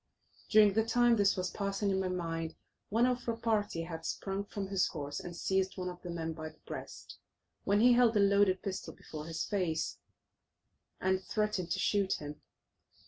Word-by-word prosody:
During 210 -2 +6
the 220 +2 +3
time 240 +1 +4
this 200 -2 +3
was 185 0 -1
passing 200 0 -1
in 190 - +1
my 190 - 0
mind, 165 -3 -3 0.3
one 230 +4 +3
of 250 -1 0
our 230 - -1
party 210 -7 0
had 165 -1 -6
sprung 195 +3 -3
from 200 -1 -4
his 195 -1 +1
horse 145 -3 -5
and 175 -1 -7
seized 190 +2 0
one 180 -1 -2
of 180 0 -9
the 180 - -7
men 165 -1 -3
by 155 0 -6
the - - -20
breast, - - -8 0.5
when 205 +1 +3
he 245 +1 +7
held 240 -2 +5
a - - +4
loaded 200 -1 +4
pistol 195 -1 -4
before 155 0 -8
his 165 -1 -2
face 175 -6 -1 1.0
and 190 0 +1
threatened 210 -5 -1
to 190 - 0
shoot 195 0 +2
him. 150 0 -6
190 Hz, 190 wpm, -32 LUFS, 170-210 Hz, 1.0 s, he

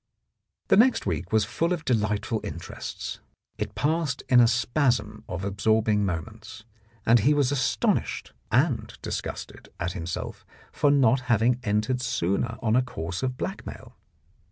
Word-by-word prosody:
The - - +6
next 250 +4 +4
week 90 -1 -2
was 110 -1 +3
full 165 - -1
of 165 -2 -4
delightful 110 -1 0
interests; 85 +3 -6 0.4
it 105 0 -4
passed 155 -3 0
in 125 - +7
a 120 - +7
spasm 125 +2 +1
of 95 +2 -4
absorbing 105 +1 +2
moments, 110 +5 -6 0.4
and 115 +1 +6
he 145 +8 +3
was 140 -2 +2
astonished 130 - 0 0.2
and - - +2
disgusted - - -5
at 90 +1 -1
himself 85 -1 -5 0.3
for 145 - +2
not 135 -3 +4
having 120 +2 +3
entered 110 +5 0
sooner 115 +1 -1
on 110 -1 +2
a 125 - +5
course 95 -8 -5
of 130 -1 -2
blackmail. 195 - -6
115 Hz, 140 wpm, -26 LUFS, 100-130 Hz, 0.4 s, in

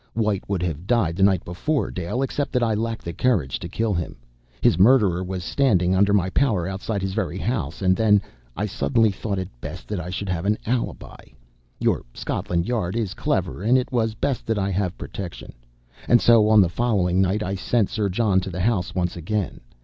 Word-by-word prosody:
White 105 -4 +1
would 95 -3 -1
have 85 +1 -4
died 110 -9 +2
the 95 - -3
night 95 -2 +3
before, 140 - -1
Dale, 90 +9 -2
except 140 +1 -2
that 125 -2 +2
I 115 -2 +2
lacked 115 +1 -3
the 85 - -4
courage 95 - 0
to - - -6
kill 115 -2 -1
him. 85 -2 -3 0.4
His 80 - +3
murderer 100 -5 +5
was 90 -1 -4
standing, 95 -6 +2
under 100 +2 +3
my 95 -2 +2
power, 105 -11 +1
outside 95 +1 -3
his 95 -1 -2
very 95 -3 -2
house 100 - -3
and 95 0 +4
then 105 0 +4 0.4
I 105 - 0
suddenly 110 +2 +1
thought 100 +1 -3
it 95 -1 -3
best - - -7
that 105 -3 -2
I 90 0 -6
should 95 +2 -4
have 90 +1 -2
an 105 +1 +2
alibi. 120 +1 -3 0.6
Your - - +1
Scotland 85 0 -2
Yard 110 -7 -1
is 110 -5 -1
clever, - - -1
and 120 +6 +4
it 130 0 -2
was 115 -3 0
best 135 +3 -2
that 115 -1 0
I 100 -1 0
have 95 -1 -1
protection. 90 -3 -7 0.5
And 120 - +6
so, 115 -3 +5
on 110 -1 +7
the 95 - +4
following 95 -4 +1
night, 95 +3 +1
I 95 - -2
sent 105 +2 0
Sir 105 -2 0
John 100 -1 +2
to 95 +1 -5
the 90 0 -4
house 100 -3 0
once 90 -2 -1
again. 95 +4 -3
100 Hz, 210 wpm, -23 LUFS, 90-115 Hz, 0.6 s, on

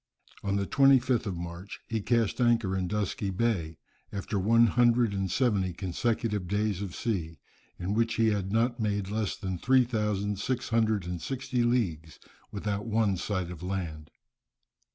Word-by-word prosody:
On 100 0 -1
the 100 -1 0
25th 130 -2 +4
of 95 -3 -3
March 85 +3 -7
he 110 -1 -2
cast 115 +1 +1
anchor 115 -5 +2
in 95 -1 -1
Dusky 105 0 -2
Bay, 95 -6 -1 0.3
after 100 0 -3
one 115 +5 +5
hundred 120 -1 +3
and 95 -1 -1
seventy 100 -8 +1
consecutive 105 +2 -1
days 105 0 0
of 95 -4 -5
sea, 85 -8 -2 0.4
in 90 +3 -2
which 115 +1 +1
he 115 -1 +3
had 100 -2 -1
not 120 +3 +1
made 105 -3 -1
less 110 -2 -1
than 95 -4 -4
three 130 +4 +4
thousand 105 -4 -1
six 125 +4 -2
hundred 110 -4 +1
and 90 -1 -4
sixty 130 -2 -2
leagues, 95 -11 0 0.3
without 105 +1 -3
one 110 -3 +2
sight 95 -1 -2
of 85 -2 -9
land. 85 -5 -4
105 Hz, 160 wpm, -29 LUFS, 95-115 Hz, 0.4 s, one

